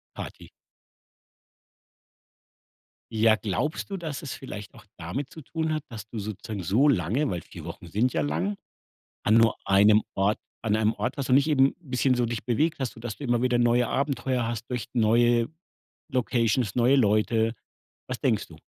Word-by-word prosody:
Party. - - -8 2.7
Ja, 110 0 +5
glaubst 115 - -2
du, 195 - -3
dass 155 -5 -5
es 145 - -5
vielleicht 105 -6 -8
auch 120 -6 -16
damit 90 - -4
zu 160 - -11
tun 160 +2 -2
hat, 155 - -2
dass 110 -2 -8
du 115 - -6
sozusagen 105 0 -5
so 110 - +3
lange, 120 - +1
weil 85 -3 -3
4 - - -11
Wochen - - -8
sind 110 +9 0
ja 80 - +1
lang, 85 +8 -1 0.7
an 105 - +2
nur 115 -1 +5
einem 105 +2 +5
Ort 100 +2 +1 0.2
an 110 -2 +1
einem 110 0 +2
Ort 125 - -3
warst 135 -2 -3
und 130 - +7
nicht 140 +2 +3
eben 135 -3 +4
bisschen 130 -4 +1
so 120 -1 +1
dich 115 0 -4
bewegt 145 +7 0
hast, 130 -3 -2
sodass 115 -1 -7
du 145 - -8
immer 120 -2 +1
wieder 125 0 +2
neue 120 0 +3
Abenteuer 130 -3 0
hast 115 0 -4
durch 125 -1 -3
neue 120 0 +3 0.6
Locations, 120 - 0
neue 125 +3 +4
Leute. 110 -1 +2 0.5
Was - - -5
denkst - - +1
du? - - -13
120 Hz, 175 wpm, -26 LUFS, 105-130 Hz, 2.7 s, und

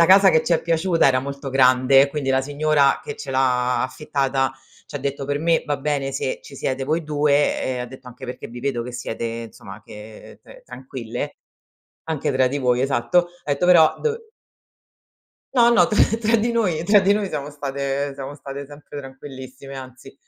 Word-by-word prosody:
la 170 - +8
casa 190 +1 +7
che 160 - +3
ci 175 - +1
è 165 - +3
piaciuta 165 -1 +2
era 130 -1 +3
molto 140 0 -6
grande, 130 +1 +5
quindi 140 -2 -2
la 130 0 +3
signora 145 0 +2
che - - -6
ce 140 - -7
l'ha 125 -1 +1
affittata, 135 -2 -1 0.3
c'ha 145 - -6
detto: 140 0 -3
"Per 145 +1 -1
me 165 +1 +2
va 145 -2 -1
bene 140 -1 -2
se 130 -1 -3
ci 140 - -12
siete 135 +1 -2
voi 155 +3 -1
2" 145 -1 +1
e 130 -1 -2
ha 125 - -4
detto 130 0 -12
anche: 125 +2 -11
"Perché 125 0 -7
vi 120 - -9
vedo 130 -3 -1
che 125 +1 -7
siete 120 -1 -5
insomma 115 -3 -7
che 105 +1 -12
t - - -15
tranquille, 130 - -6 0.7
anche 155 -3 -2
tra 130 0 +3
di 140 - -3
voi" 125 -2 +1
Esatto. 135 +7 +2 0.2
Ha - - -4
etto: 160 +6 0
"Però 160 -3 +6
dov" 455 -1 0 1.4
No, 240 -2 +6
no, 235 - +5
tra 210 - +3 0.2
tra 230 0 +2
di 235 +2 0
noi 180 -8 0
tra 205 +1 +6
di 195 +1 +3
noi 210 -1 -1
siamo 145 -3 -4
state 140 -1 -3
siamo 140 +1 -7
state 140 -1 -8
sempre 145 0 -11
tranquillissime, 135 0 -10
anzi. 130 0 -11
140 Hz, 190 wpm, -22 LUFS, 130-155 Hz, 1.4 s, la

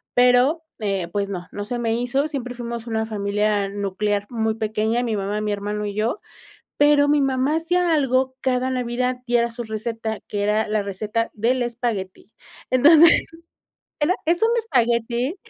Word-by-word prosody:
pero, 250 +6 +4 0.2
eh, 195 -5 -1
pues, 200 +2 -2
no, 180 -2 -5
no 205 - -5
se 240 +4 -4
me 230 -1 0
hizo, 255 +5 0
siempre 250 -5 -5
fuimos 235 -1 -6
una 220 -1 -1
familia 205 -1 0
nuclear 205 +1 -2
muy 220 -2 -1
pequeña, 220 +2 -1
mi 230 -3 -1
mamá, 205 +1 -2
mi 210 0 -1
hermano, 205 +1 -3
y 205 - -4
yo, 220 - -1 0.6
pero 290 0 +5
mi 295 0 +3
mamá 270 +2 +1
hacía 345 +1 +1
algo 260 -3 +1
cada 255 0 0
Navidad 250 0 -1
y 240 - +1
era 235 0 +2
su 230 - -7
receta, 220 0 -4
que 205 - -3
era 210 +2 +1
la 215 0 0
receta 210 +3 -2
del 240 +4 0
espagueti. 230 -5 -4 0.4
Entonces, 315 +6 +6 0.8
era 310 +5 +3
es 345 +4 +1
un 450 - +5
espagueti 240 - 0
235 Hz, 165 wpm, -22 LUFS, 210-255 Hz, 0.8 s, Entonces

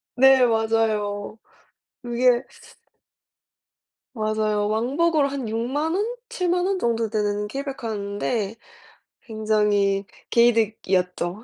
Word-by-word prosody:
네. 265 0 +6
맞아요. 220 -2 0 0.7
그게 245 +1 +2 1.7
맞아요. 215 -2 0
왕복으로 280 +8 +1
한 275 -4 -4
60,000 265 +9 -1
원, 410 +3 0 0.2
70,000 360 -5 0
원 385 -1 0
정도 230 -2 0
되는 210 -1 -1
케이블카였는데 220 -5 -3 0.7
굉장히 210 -3 +1 0.3
개이득이었죠. 210 -5 +1
225 Hz, 190 characters per minute, -23 LUFS, 210-260 Hz, 1.7 s, 네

